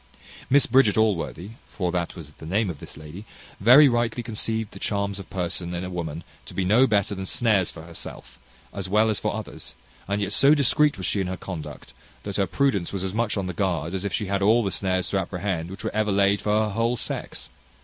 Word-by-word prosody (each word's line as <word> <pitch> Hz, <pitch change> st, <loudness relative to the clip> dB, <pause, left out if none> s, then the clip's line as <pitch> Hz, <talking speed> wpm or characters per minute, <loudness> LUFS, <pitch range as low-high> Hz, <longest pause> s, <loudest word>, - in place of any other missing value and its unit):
Miss 140 Hz, 0 st, +5 dB
Bridget 115 Hz, -5 st, +4 dB
Allworthy 100 Hz, -3 st, 0 dB, 0.2 s
(for 90 Hz, -3 st, -2 dB
that 85 Hz, -1 st, -2 dB
was 80 Hz, -4 st, -9 dB
the 80 Hz, -, -13 dB
name 100 Hz, +2 st, +1 dB
of 75 Hz, -, -10 dB
this -, -, -10 dB
lady) 75 Hz, +6 st, -9 dB, 0.4 s
very 125 Hz, +8 st, +8 dB
rightly 120 Hz, -1 st, 0 dB
conceived 110 Hz, -1 st, -2 dB
the -, -, -11 dB
charms 100 Hz, -1 st, -1 dB
of 95 Hz, -, -10 dB
person 90 Hz, -1 st, -2 dB
in 85 Hz, -, -3 dB
a 90 Hz, -, -5 dB
woman 85 Hz, -2 st, -4 dB, 0.2 s
to -, -, -10 dB
be 95 Hz, -, 0 dB
no 115 Hz, +8 st, +5 dB
better 100 Hz, -2 st, +1 dB
than 95 Hz, -1 st, -5 dB
snares 105 Hz, -6 st, +2 dB
for 80 Hz, -, -9 dB
herself, 85 Hz, 0 st, -9 dB, 0.3 s
as 100 Hz, -2 st, -5 dB
well 110 Hz, +2 st, +3 dB
as 105 Hz, -, -1 dB
for 105 Hz, -, -1 dB
others; 110 Hz, -1 st, -8 dB, 0.3 s
and 100 Hz, +1 st, -1 dB
yet 100 Hz, -, -2 dB
so 140 Hz, +2 st, +6 dB
discreet 150 Hz, 0 st, +3 dB
was 95 Hz, -, -5 dB
she 100 Hz, -, 0 dB
in 95 Hz, -, -2 dB
her 95 Hz, 0 st, -4 dB
conduct, 75 Hz, -7 st, -8 dB, 0.3 s
that 100 Hz, -2 st, -4 dB
her 100 Hz, -2 st, +1 dB
prudence 100 Hz, -2 st, 0 dB
was 95 Hz, -2 st, -3 dB
as 95 Hz, 0 st, -3 dB
much 110 Hz, -1 st, 0 dB
on 100 Hz, -, -1 dB
the 90 Hz, -, -4 dB
guard 85 Hz, -3 st, -1 dB
as 95 Hz, 0 st, -3 dB
if 100 Hz, -, -2 dB
she 105 Hz, -, -1 dB
had 100 Hz, 0 st, -1 dB
all 110 Hz, +4 st, +4 dB
the 100 Hz, -, -1 dB
snares 95 Hz, -2 st, 0 dB
to 100 Hz, -, +1 dB
apprehend 90 Hz, -2 st, -3 dB
which 95 Hz, -, -9 dB
were -, -, -3 dB
ever 105 Hz, 0 st, +1 dB
laid 100 Hz, 0 st, +3 dB
for 105 Hz, +1 st, +2 dB
her 105 Hz, -, -1 dB
whole 115 Hz, +4 st, 0 dB
sex. -, -, -5 dB
100 Hz, 230 wpm, -25 LUFS, 90-110 Hz, 0.4 s, very